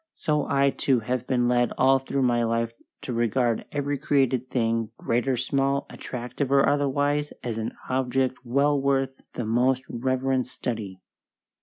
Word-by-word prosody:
so 150 -1 0
I, 140 0 +3
too, 130 -3 +1
have 125 +2 -2
been 120 -2 +2
led 120 0 +2
all 135 0 +5
through 135 0 -1
my 120 -1 +2
life 115 0 0 0.3
to 125 - -4
regard 120 0 +1
every 145 -1 -2
created 130 -3 +1
thing, 115 -2 0
great 120 +3 -1
or 130 -2 +1
small, 135 +2 0
attractive 125 +2 -4
or 140 0 +5
otherwise, 145 +1 +1
as 115 -2 -3
an 110 - -3
object 130 0 0
well 140 +3 +2
worth 135 -1 +1 0.2
the 120 - -3
most 125 +3 +2
reverent 130 +1 0
study. 110 -6 -5
130 Hz, 155 wpm, -25 LUFS, 120-135 Hz, 0.3 s, all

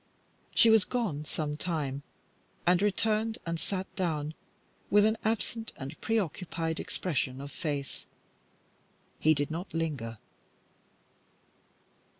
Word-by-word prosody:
She 230 - +8
was 220 -3 +7
gone 190 - -1
some 150 -1 -2
time, 150 -5 -1 0.6
and 180 +1 +5
returned 215 +2 +2
and 165 -1 -1
sat 190 +1 -2
down 155 -6 0 0.6
with 205 0 +6
an 220 +1 +4
absent 225 0 -1
and 135 +4 -7
preoccupied 170 -6 -1
expression 135 -7 -1
of 140 +1 -6
face, 145 -2 -3 1.1
and - - -22
he 155 0 +6
did 145 +2 0
not 170 +4 -4
linger. 140 -9 -2
165 Hz, 115 wpm, -31 LUFS, 150-205 Hz, 1.1 s, She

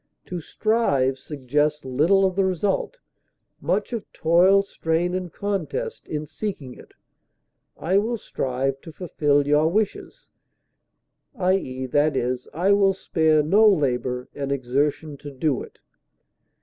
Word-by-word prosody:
To 180 -2 -5
strive 140 - +1
suggests 150 +1 -1
little 160 +10 +3
of 185 -1 0
the 195 - +2
result, 190 - -1 0.6
much - - -1
of 225 -4 -5
toil, 180 +5 +4
strain, 170 -2 -1
and 185 -2 -3
contest, 205 - -4
in 150 0 -4
seeking 150 -7 -6
it; - - -16 0.8
I 190 +4 +2
will 230 +3 -1
strive 135 - -3
to 165 - -10
fulfil 145 -4 0
your 150 +2 +3
wishes, 215 - -2 1.0
i. 185 -4 +2
e., 130 -8 -3
I 145 +5 0
will 200 -1 +4
spare 160 -4 +2
no 205 +8 +5
labor 125 -7 0
and 140 -1 -4
exertion 140 +3 -1
to 145 - -9
do 140 0 -1
it. - - -11
160 Hz, 125 wpm, -23 LUFS, 140-195 Hz, 1.0 s, no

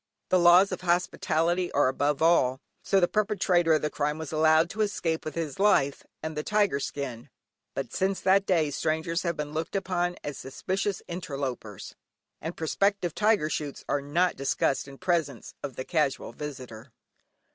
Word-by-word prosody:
The 185 - +4
laws 175 +3 +6
of - - -4
hospitality 175 0 +1
are - - +4
above 145 +3 0
all, 130 -6 +4 0.2
so 195 - +2
the 175 - +3
perpetrator 190 -6 +2
of 155 - +1
the 150 - 0
crime 150 +1 -1
was 160 -2 -6
allowed 160 +1 +4
to 215 - -3
escape 175 -6 -1
with 155 - -6
his 160 -3 -4
life 140 -9 +3 0.2
and 160 0 -4
the 150 - -1
tiger 205 -4 +1
skin, 135 -5 -5 0.5
but - - -4
since 190 0 0
that 195 +1 +3
day 160 -6 +2
strangers 160 +4 -1
have 170 -2 -2
been 150 -1 -4
looked 160 +5 -3
upon 180 -2 -1
as 145 -2 -5
suspicious 190 +8 -3
interlopers, 135 - -5 0.5
and 165 +3 -5
prospective 185 +2 0
tiger 210 -6 +2
shoots 150 -2 -4
are 145 - 0
not 170 +6 +1
discussed 135 0 0
in 135 0 -11
presence 160 - -1
of 140 -3 -6
the 130 - -5
Casual 155 -5 -1
Visitor. 130 -5 -8
160 Hz, 170 wpm, -27 LUFS, 145-180 Hz, 0.5 s, laws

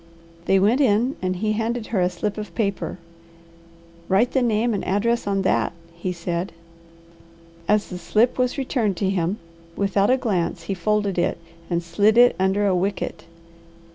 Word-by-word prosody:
They 195 - +4
went 215 +8 +3
in 245 +2 +2
and 185 0 -1
he 215 +4 -1
handed 225 +1 -1
her 195 - +2
a 180 - +3
slip 200 +4 -3
of 200 -5 -8
paper. 200 -3 -2 1.1
"Write 200 +6 +3
the 265 - +2
name 230 0 +1
and 200 - -2
address 225 +4 0
on 195 -1 0
that?" - - +1 0.2
he 170 +2 -4
said. 170 +1 -3 1.1
As 210 0 +2
the 180 - -6
slip 220 +8 +1
was 250 +1 +1
returned 240 -8 -1
to 195 -2 0
him, 185 +1 -1 0.4
without 200 0 +1
a 260 - +4
glance 185 -9 -1
he 180 - -3
folded 200 0 0
it - - 0 0.3
and 170 -1 -1
slid 205 +7 +2
it 245 0 +6
under 190 +2 +2
a 190 -2 +2
wicket. 190 +2 -2
200 Hz, 170 wpm, -23 LUFS, 185-225 Hz, 1.1 s, it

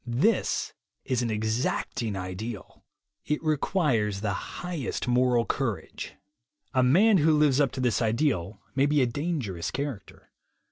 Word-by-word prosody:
This 130 - +1 0.3
is 130 -3 0
an 120 - -1
exacting 110 0 -1
ideal. 95 +4 -6 0.4
It 150 - -1
requires 140 - +1
the 105 -2 0
highest 170 - -4
moral 125 -1 +3
courage. 115 - -3 0.6
A 130 - +3
man 190 - +5
who 155 0 +4
lives 150 -2 +4
up 140 -4 +2
to - - -5
this 125 -2 +1
ideal 110 - 0
may 135 +1 +3
be 145 -2 +3
a - - +4
"dangerous" 125 - -2
character. 135 -8 -6
125 Hz, 135 wpm, -27 LUFS, 110-150 Hz, 0.6 s, man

